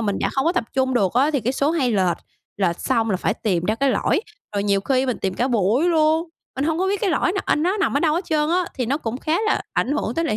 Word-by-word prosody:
mình 205 -3 -1
đã - - 0
không 270 - 0
có 335 - +2
tập 235 - 0
trung 260 -1 +1
được 195 -7 +2
á, 275 +5 +3
thì 280 -4 0
cái 245 +4 -1
số 280 +2 +1
hay 280 -7 +1
lệch, 185 -4 +1 0.4
lệch 175 -4 0
xong 225 -1 0
là 185 - +1
phải 200 +3 -1
tìm 180 -8 -1
ra 215 +4 +1
cái 275 +3 +1
lỗi, 355 - +1 0.3
rồi 200 - 0
nhiều 200 -1 +2
khi 260 +4 +1
mình 250 - -1
tìm 190 -1 -2
cả 250 +3 0
buổi 230 - +2
luôn, 320 0 +2 0.3
mình 270 - -1
hông 320 +1 0
có 380 - +1
biết 400 0 -1
cái 390 - +1
lỗi 345 +3 +1
nà 395 - 0
anh 300 - +1
nó 370 +4 +1
nằm 395 -8 0
ở - - +2
đâu 310 -2 +2
hết 345 +2 -1
trơn 305 -1 0
á, 360 +1 +2
thì 250 -4 -2
nó 275 +4 +1
cũng 230 -3 -4
khá 310 +3 -1
là - - +1
ảnh 275 - 0
hưởng 240 -5 -2
tới 330 - 0
lại 215 - 0
270 Hz, 305 wpm, -22 LUFS, 220-320 Hz, 0.4 s, á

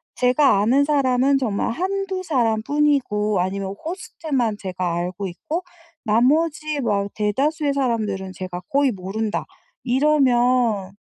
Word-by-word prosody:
제가 250 -3 +3
아는 260 +7 +3
사람은 275 -2 +2
정말 220 -6 -1
1-2 380 +5 -2
사람 235 -10 +1
뿐이고 250 -9 +1
아니면 195 +1 -3
호스트만 300 - -2
제가 185 -3 -3
알고 180 +3 -3
있고 305 - -4 0.4
나머지 295 +7 +2
뭐 235 -6 0
한 200 - -4
대다수의 280 +8 0
사람들은 215 -8 -1
제가 185 -1 -6
거의 275 -1 +2
모른다. 205 +3 -3 0.4
이러면 245 -6 +2
245 Hz, 270 characters per minute, -22 LUFS, 205-290 Hz, 0.4 s, 제가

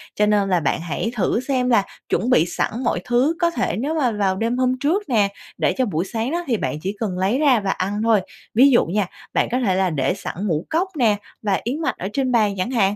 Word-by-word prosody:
Cho 210 - +3
nên 205 -2 +2
là 180 - +3
bạn 155 +1 -1
hãy 175 +7 -3
thử 220 +1 +1
xem 255 -1 0
là 230 -5 +4 0.3
chuẩn 235 - 0
bị 165 -10 +4
sẵn 175 - -2
mọi 205 - 0
thứ 255 +7 +2
có 340 -1 +3
thể 335 - -1
nếu 285 +8 -2
mà 260 -7 +1
vào 200 -3 0
đêm 230 +5 -1
hôm 255 0 +1
trước 325 +10 +1
nè, 210 -5 +3 0.3
để - - +1
cho 260 - +2
buổi 180 -4 -1
sáng 225 +6 -3
đó 345 +1 -1
thì 235 -4 +1
bạn 150 - -2
chỉ 195 +2 -3
cần 200 -5 -2
lấy 195 +8 +1
ra 275 -6 +4
và 195 -2 -1
ăn 205 +3 -2
thôi. 225 -3 +4 0.3
Ví 260 +5 +6
dụ 240 - +4
nha, 195 +2 -1 0.3
bạn - - +2
có 250 - +1
thể 200 -7 +1
là 190 0 +2
để 140 0 0
sẵn 195 - -6
ngũ 160 -3 -1
cốc 345 +4 +1
nè, 225 -6 +3 0.3
và 200 -3 0
yến 275 +7 -3
mạch - - -1
ở 185 - -4
trên 260 0 0
bàn 215 -4 +3
chẳng 185 +7 -2
hạn, 205 -5 +2
220 Hz, 260 wpm, -21 LUFS, 195-255 Hz, 0.3 s, Ví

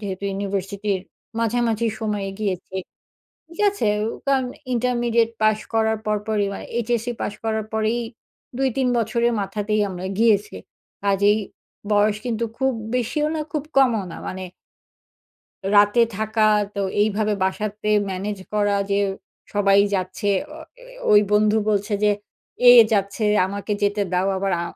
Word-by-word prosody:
যেহেতু 200 -1 -5
ইউনিভার্সিটির 195 0 -2 0.4
মাঝামাঝি 230 0 +1
সময়ে 210 -3 -2
গিয়েছি, 190 -3 -3 0.7
ঠিক 335 +3 -16
আছে? 405 - -3 0.2
ও - - -1 0.2
কারণ 270 -2 +2 0.3
ইন্টারমিডিয়েট 240 -1 +1
পাস 215 0 +3
করার 220 0 +2
পর, 210 0 +1
পরই, 210 -2 +1
মানে - - -7
এইচএসসি 240 0 -1
পাস 205 - -2
করার 220 -1 -1
পরেই 220 +2 0 0.6
২-৩ 265 -1 +1
বছরের 235 +1 +1
মাথাতেই 210 +2 -1
আমরা 185 0 -6
গিয়েছি। 210 -2 +3 0.6
আজ 195 -1 +2
এই 210 - +2 0.5
বয়স 210 0 +3
কিন্তু 235 -2 -1
খুব 265 0 +2 0.2
বেশিও 275 +5 0
না, - - -2
খুব 300 -3 -2
কমও 240 -6 +4
না, - - -7
মানে 185 - -5 1.3
রাতে 205 +3 +5 0.2
থাকা 220 +1 -1 0.3
তো 200 - -2 0.2
এইভাবে 215 0 +1
বাসাতে 210 +2 -3 0.2
ম্যানেজ 195 +2 -4
করা 205 -1 +2 0.2
যে 200 - +2 0.6
সবাই 200 -1 +4 0.2
যাচ্ছে। 190 +2 -2 0.3
অ - - -10 0.2
এ - - -16 0.3
ওই 210 0 +8
বন্ধু 210 +1 +4
বলছে 205 0 0
যে, 210 - +5 0.6
এ - - +11 0.2
যাচ্ছে, 200 +1 0 0.2
আমাকে 200 +2 -4
যেতে 205 0 +1
দাও। 180 +1 +1
আবার 195 0 -1
আ - - -2
210 Hz, 140 wpm, -22 LUFS, 200-230 Hz, 1.3 s, এ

